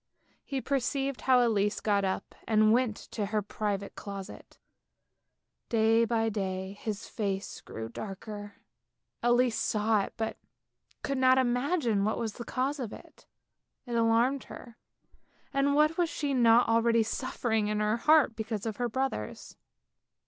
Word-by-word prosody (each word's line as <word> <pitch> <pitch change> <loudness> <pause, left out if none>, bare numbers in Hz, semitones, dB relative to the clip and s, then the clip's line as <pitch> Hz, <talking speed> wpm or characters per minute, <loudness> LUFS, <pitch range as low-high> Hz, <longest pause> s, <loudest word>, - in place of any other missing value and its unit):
He 270 -2 -3
perceived 275 0 -1
how 250 -2 +4
Elise 205 -2 +1
got 200 -2 +1
up 190 0 -2
and 215 -1 +4
went 240 -3 +2 0.2
to 210 -3 -2
her 210 0 -1
private 200 -1 -3
closet. 200 -1 -9 1.1
Day 225 0 +4
by 225 -1 +1
day 190 -2 -3
his 215 -1 -4
face 200 -2 -3
grew 110 0 -7
darker, 205 - -7 0.7
Elise 240 0 +3
saw 215 0 +2
it - - -5
but 220 -1 -3 0.7
could 275 -2 -1
not 260 0 +5
imagine 245 - +1
what 215 +2 0
was 225 -3 -3
the 235 - -7
cause 270 +5 -1
of 235 -5 -4
it. - - -14 0.6
It 240 - -6
alarmed 235 +4 +2
her, 235 -2 -11 0.8
and 275 +1 +2
what 305 +3 +3
was 345 -2 +2
she 290 -3 -2
not 235 -1 +5
already 230 0 +3
suffering 225 -2 -1
in 210 0 -1
her 210 +1 +1
heart 300 -2 +4
because 220 -1 -4
of 220 -2 -3
her 245 -1 -1
brothers 260 - -3
225 Hz, 145 wpm, -29 LUFS, 210-255 Hz, 1.1 s, not